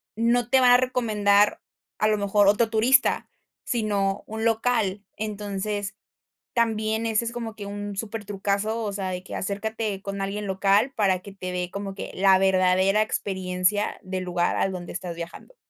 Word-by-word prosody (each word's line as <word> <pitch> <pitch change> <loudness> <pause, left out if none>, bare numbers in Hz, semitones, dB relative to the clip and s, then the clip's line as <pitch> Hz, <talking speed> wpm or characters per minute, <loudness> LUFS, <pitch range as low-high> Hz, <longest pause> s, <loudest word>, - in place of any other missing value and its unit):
no 235 +1 +2
te 265 - +6
va 245 -1 +7
a - - +8
recomendar, 215 -5 +2 0.4
a 215 - +2
lo 215 -1 +2
mejor, 200 0 +3
otro 215 +2 +4
turista, 240 +4 +3 0.4
sino 205 -4 -1
un 220 +1 -4
local. 220 -3 +1
Entonces, 205 -1 -3 0.6
también 220 -1 0
ese 225 0 +1
es 235 - -3
como 230 -2 -5
que 205 - -7
un 205 0 -5
súper 215 +1 -5
trucazo, 205 +3 -1
o 205 - -2
sea, 195 -2 -3
de 180 0 -5
que - - -10
acércate 205 0 -3
con 200 0 -5
alguien 200 +2 -3
local 200 +6 +2
para 190 -4 +2
que 200 +2 -11
te 185 -2 -6
dé 180 0 -2
como 200 -1 -5
que - - -6
la 190 0 +5
verdadera 190 +1 +3
experiencia 190 -1 -1
del 185 0 -4
lugar 175 -1 0
al 195 - +1
donde 175 -1 -6
estás 175 -1 -5
viajando. 170 - -9
205 Hz, 170 wpm, -25 LUFS, 195-220 Hz, 0.6 s, a